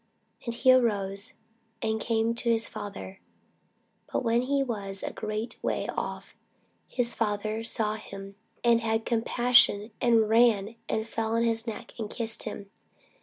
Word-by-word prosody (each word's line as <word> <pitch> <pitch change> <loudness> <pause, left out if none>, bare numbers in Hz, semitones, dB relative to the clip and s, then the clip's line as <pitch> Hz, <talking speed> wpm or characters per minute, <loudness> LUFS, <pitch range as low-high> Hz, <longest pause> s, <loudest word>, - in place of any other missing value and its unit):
And 235 -1 -3
he 255 +2 +6
arose, 205 -4 +1 0.5
and 220 0 -1
came 225 0 +1
to 235 0 -1
his 230 -1 +2
father. 195 -2 -7 0.9
But - - 0
when 235 0 +3
he 275 +2 +1
was 200 -6 -4
yet - - -2
a - - -19
great 215 +2 -4
way - - -1
off, - - -4 0.5
his 240 -2 -1
father 215 0 -1
saw 225 -2 0
him, 195 -2 -9 0.3
and 235 -1 +5
had 225 0 0
compassion, 235 -2 +4
and 230 -3 +4
ran, 225 -1 +4
and 220 0 -1
fell 225 0 -1
on 230 - +3
his 230 0 +1
neck, 225 - -6
and 215 -2 -3
kissed 225 0 -4
him. 200 -2 -6
225 Hz, 155 wpm, -28 LUFS, 210-235 Hz, 0.9 s, he